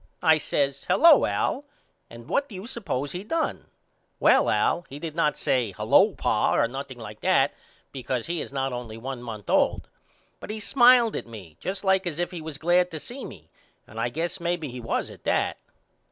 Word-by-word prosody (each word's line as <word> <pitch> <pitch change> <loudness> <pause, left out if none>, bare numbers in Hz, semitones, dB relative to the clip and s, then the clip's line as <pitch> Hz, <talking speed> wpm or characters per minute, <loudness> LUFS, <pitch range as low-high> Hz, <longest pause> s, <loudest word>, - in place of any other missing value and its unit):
I 160 -2 +5
says 140 -2 -1
Hello 335 +1 +6
Al 280 - -1 0.5
and 115 +1 -12
what 280 - 0
do 210 - -9
you 185 +3 -7
suppose 190 - -3
he 180 +3 -5
done. 325 +9 -2 0.5
Well - - +4
Al 175 - +1
he 140 - -8
did 155 +1 -6
not 150 -3 +1
say 120 -6 0
Hello - - +4
pa - - +1
or 115 - +3
nothing 135 +1 -7
like 105 -2 -9
that - - +3 0.4
because 130 -2 -3
he 170 -2 -2
is - - -7
not 135 -1 -2
only 120 -3 -6
one 130 +1 -6
month 110 -4 -8
old. - - +2 0.5
But - - -10
he 215 +1 -4
smiled 240 0 +5
at - - -4
me 100 -9 -11
just 190 +1 -4
like 190 -1 +2
as 160 -4 -4
if 175 +1 -2
he 175 -3 -6
was 155 -2 -7
glad 175 +3 +2
to 160 - -6
see 250 - -8
me - - -11 0.3
and - - -10
I - - 0
guess 170 +3 -3
maybe 170 -3 -2
he 125 0 -7
was 115 - -2
at - - -15
that. - - +1
155 Hz, 200 wpm, -25 LUFS, 125-185 Hz, 0.5 s, Hello